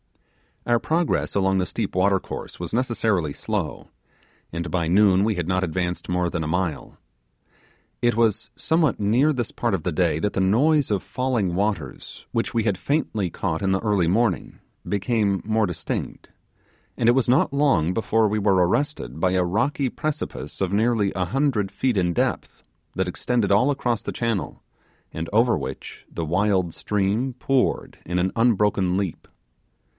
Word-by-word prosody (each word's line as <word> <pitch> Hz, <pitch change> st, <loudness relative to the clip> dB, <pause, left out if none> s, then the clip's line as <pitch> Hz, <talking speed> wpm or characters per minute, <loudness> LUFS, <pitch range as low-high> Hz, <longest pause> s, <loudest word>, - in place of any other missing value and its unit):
Our 120 Hz, -1 st, +3 dB
progress 165 Hz, +5 st, 0 dB
along 95 Hz, -1 st, +2 dB
the 90 Hz, -, +1 dB
steep -, -, -3 dB
watercourse 95 Hz, +1 st, -1 dB
was 85 Hz, -1 st, -5 dB
necessarily 110 Hz, -, 0 dB
slow, -, -, -4 dB, 0.6 s
and 85 Hz, +1 st, -4 dB
by 85 Hz, -3 st, 0 dB
noon 95 Hz, +1 st, +4 dB
we 110 Hz, 0 st, +1 dB
had 90 Hz, -2 st, -3 dB
not 95 Hz, 0 st, +1 dB
advanced 90 Hz, 0 st, -2 dB
more 90 Hz, -1 st, 0 dB
than 85 Hz, -1 st, -3 dB
a -, -, -3 dB
mile. 90 Hz, 0 st, -2 dB, 1.0 s
It 120 Hz, -2 st, +2 dB
was 115 Hz, -1 st, +1 dB
somewhere 160 Hz, -5 st, +2 dB
near 120 Hz, +9 st, +3 dB
this 120 Hz, -3 st, -3 dB
part 120 Hz, -3 st, -1 dB
of 95 Hz, -, 0 dB
the 90 Hz, -, -1 dB
day 80 Hz, -1 st, +1 dB
that 105 Hz, +5 st, -1 dB
the -, -, -1 dB
noise 135 Hz, +10 st, +3 dB
of 100 Hz, -3 st, +1 dB
falling 125 Hz, -8 st, -1 dB
waters, 100 Hz, -8 st, -3 dB
which -, -, -1 dB
we 115 Hz, -, +1 dB
had 100 Hz, -4 st, 0 dB
faintly 110 Hz, -, -1 dB
caught 80 Hz, -2 st, -3 dB
in 95 Hz, -, +1 dB
the 95 Hz, -, +1 dB
early 105 Hz, -6 st, +1 dB
morning, 100 Hz, 0 st, 0 dB, 0.3 s
became 100 Hz, -1 st, 0 dB
more 110 Hz, 0 st, +2 dB
distinct; 90 Hz, -3 st, -5 dB, 0.7 s
and 115 Hz, -, +3 dB
it -, -, +6 dB
was 130 Hz, -1 st, +1 dB
not 135 Hz, +2 st, +3 dB
long 135 Hz, -, +2 dB
before 110 Hz, +1 st, +2 dB
we 105 Hz, +1 st, 0 dB
were 95 Hz, -3 st, +3 dB
arrested 95 Hz, -, -2 dB
by 90 Hz, +1 st, +2 dB
a 90 Hz, -1 st, +2 dB
rocky 125 Hz, +9 st, 0 dB
precipice 155 Hz, -4 st, -5 dB
of 95 Hz, 0 st, 0 dB
nearly 110 Hz, -2 st, +2 dB
a 95 Hz, -1 st, 0 dB
hundred 125 Hz, -5 st, 0 dB
feet 125 Hz, -5 st, 0 dB
in 90 Hz, -2 st, +1 dB
depth, -, -, -2 dB, 0.3 s
that 95 Hz, 0 st, 0 dB
extended 110 Hz, +3 st, 0 dB
all 125 Hz, +8 st, +4 dB
across 120 Hz, -5 st, -1 dB
the -, -, -4 dB
channel, 115 Hz, -4 st, -3 dB, 0.5 s
and 80 Hz, +1 st, -5 dB
over 115 Hz, +2 st, +4 dB
which -, -, -7 dB
the 85 Hz, -, -3 dB
wild 90 Hz, 0 st, +1 dB
stream 105 Hz, +6 st, -1 dB
poured 130 Hz, +1 st, 0 dB
in 90 Hz, +1 st, -3 dB
an 90 Hz, +1 st, +1 dB
unbroken 105 Hz, -5 st, +2 dB
leap. 95 Hz, -4 st, -3 dB
100 Hz, 170 wpm, -23 LUFS, 90-120 Hz, 1.0 s, it